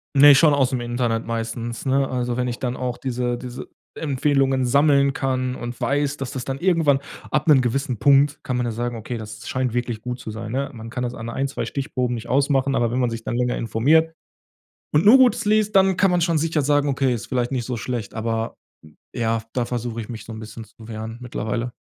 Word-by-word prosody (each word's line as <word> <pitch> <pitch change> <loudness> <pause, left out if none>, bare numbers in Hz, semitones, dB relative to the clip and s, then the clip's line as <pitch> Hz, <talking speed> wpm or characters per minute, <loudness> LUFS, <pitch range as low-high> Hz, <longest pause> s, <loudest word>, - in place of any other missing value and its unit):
Ne, 145 +1 +9
schon 150 +1 +5
ausm 130 -3 +1
Internet 120 -1 -1
meistens, 115 +2 -4
ne? 135 0 +2
Also 125 -1 -2
wenn 125 0 0
ich 120 - -4
dann 125 -1 -2
auch 125 -1 -3
diese 125 -2 -2
diese 125 0 -8 0.3
Empfehlungen 135 -2 +1
sammeln 140 +1 +4
kann 130 -1 -1
und 120 0 -6
weiß, 145 +1 0
dass 135 -1 -5
das 130 -3 -5
dann 135 0 -4
irgendwann 165 -7 +3 0.3
ab 150 +1 0
'nem 140 -4 +6
gewissen 125 0 -1
Punkt, 140 +2 +4
kann 125 -1 -2
man 125 - 0
ja 120 - -1
sagen: 120 +1 -3
„Okay, 115 +2 -5
das 110 0 -9
scheint 130 -2 -1
wirklich 120 -2 -2
gut 125 +1 -5
zu 110 - -7
sein.“ 110 0 -6
Ne? 135 +2 -1
Man 115 -1 -9
kann 125 +1 -4
das 120 0 -3
an 115 -1 -6
ein, 135 +4 -1
zwei 140 - -4
Stichproben 125 -3 -2
nicht 115 0 -7
ausmachen, 135 0 +2
aber 120 -1 +1
wenn 125 - 0
man 125 -2 +2
sich 115 -1 -6
dann - - -3
länger 125 0 0
informiert 150 +9 +2 0.8
und 150 +6 +3
nur 230 +6 +9
Gutes 255 -5 +4
liest, 215 0 +2
dann 190 -1 +4
kann 195 - +4
man 175 -1 +2
schon 165 -1 +2
sicher 160 -1 0
sagen: 145 +1 +2
„Okay, 135 -1 +1
ist 115 - -5
vielleicht 125 -2 -1
nicht 125 -3 -2
so 125 0 -3
schlecht.“ 115 -1 -4
Aber, 115 0 -2 0.6
ja, 115 -1 -1
da 125 -2 0
versuche 120 -1 -4
ich 110 - -9
mich 110 -3 -7
so 115 - -8
'n 110 - -8
bisschen 110 +1 -8
zu 110 0 -15
wehren 110 0 -6
mittlerweile. 120 0 -3
125 Hz, 225 wpm, -22 LUFS, 115-140 Hz, 0.8 s, Ne